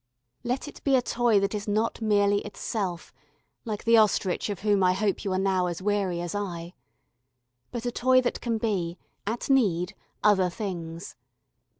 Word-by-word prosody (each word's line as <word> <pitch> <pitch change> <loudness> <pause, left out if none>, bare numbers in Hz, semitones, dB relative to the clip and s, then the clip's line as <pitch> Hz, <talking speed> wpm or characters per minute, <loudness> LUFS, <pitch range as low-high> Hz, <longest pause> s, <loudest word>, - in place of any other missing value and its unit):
Let 250 +4 -2
it 295 - -11
be 275 -2 +3
a 255 - +4
toy 235 -4 +2
that 200 +2 0
is 210 0 -4
not 215 +3 0
merely 205 -2 +3
itself, 200 -4 -4 0.5
like 215 -2 -4
the 230 0 +5
ostrich 205 -3 +2
of 200 -3 -4
whom 205 -2 +3
I 180 0 +4
hope 200 +1 -1
you 195 - -2
are 185 - +1
now 190 -1 +1
as 175 -2 -3
weary 195 -3 0
as 175 -1 -4
I, 175 -4 -4 1.0
but 240 -1 -5
a 245 - 0
toy 255 +1 +4
that 245 - -2
can 230 -2 -1
be, 185 -6 -1 0.3
at 230 +2 -2
need, 200 -9 +2 0.3
other 190 -3 +4
things. 170 -3 -6
205 Hz, 175 wpm, -27 LUFS, 185-225 Hz, 1.0 s, the